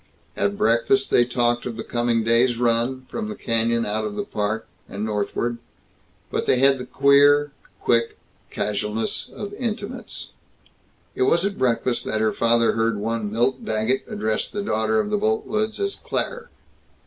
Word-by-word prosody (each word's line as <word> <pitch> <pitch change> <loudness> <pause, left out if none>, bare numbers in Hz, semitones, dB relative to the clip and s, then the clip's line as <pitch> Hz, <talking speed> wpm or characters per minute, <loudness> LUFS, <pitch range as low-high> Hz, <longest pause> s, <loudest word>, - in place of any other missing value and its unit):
At 100 0 0
breakfast 115 +4 +2
they 120 - +5
talked 120 0 0
of 115 -2 -5
the 115 - -4
coming 120 -1 0
day's 115 +2 +3
run, 120 +2 0
from 220 -2 -4
the 215 - -5
canyon 115 - 0
out 110 +1 -1
of 105 -1 -4
the - - -2
Park, 105 +1 -2 0.2
and 100 +2 -4
northward. 110 +3 -2 0.7
But - - -2
they - - +4
had 135 +1 +4
the 125 - -6
queer, 145 +1 +5 0.3
quick 115 -1 +1 0.3
casualness 105 +1 -2
of 205 -1 -7
intimates. 230 +1 -5 0.8
It - - -5
was 170 +2 +2
at 200 0 -3
breakfast 125 0 +1
that 110 - -1
her 110 0 +1
father 115 0 +3
heard 115 -1 0
one 110 0 -2
Milt 120 +4 0
Daggett 110 +4 0
address 110 +1 -1
the 205 - -4
daughter 110 - +1
of 105 -1 -1
the 105 - +1
Boltwoods 215 - -1
as 400 0 0
"Claire." - - -3
115 Hz, 160 wpm, -23 LUFS, 110-135 Hz, 0.8 s, they